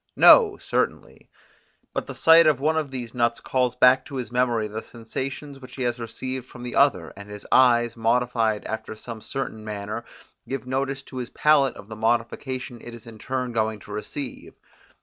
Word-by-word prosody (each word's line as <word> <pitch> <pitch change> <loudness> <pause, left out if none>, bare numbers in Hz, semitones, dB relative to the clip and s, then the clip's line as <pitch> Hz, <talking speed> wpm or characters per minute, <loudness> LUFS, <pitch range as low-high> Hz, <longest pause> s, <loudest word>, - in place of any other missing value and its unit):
No, 430 -5 +7
certainly; - - -3 0.6
but - - -3
the - - -7
sight 165 0 +7
of 150 -4 +3
one 155 +3 +1
of 155 -3 -1
these 125 -3 -6
nuts 120 -1 +1
calls 125 -2 0
back 125 +1 +5
to 140 - -9
his 125 -2 -4
memory 120 -3 +1
the 110 +1 -5
sensations 135 +4 -6
which 130 -1 -12
he 130 - -3
has 120 0 -1
received 130 +2 -5
from 120 - -11
the 125 - -5
other; 95 - +3
and 100 +1 -11
his 105 0 -9
eyes, 120 -2 +4
modified 115 -2 +1
after 110 0 -5
some 110 0 -9
certain 110 -4 -5
manner, 105 +1 -5 0.5
give 135 -1 -4
notice 135 +1 -2
to 130 - -10
his 125 -1 -4
palate 145 -4 +3
of 100 - -12
the 110 - -8
modification 120 +3 -2
it 120 0 -9
is 115 - -13
in 115 -1 -11
its - - -15
turn 130 -1 -2
going 110 -1 0
to 100 - -12
receive. 120 +6 -6
125 Hz, 190 wpm, -24 LUFS, 115-130 Hz, 0.6 s, No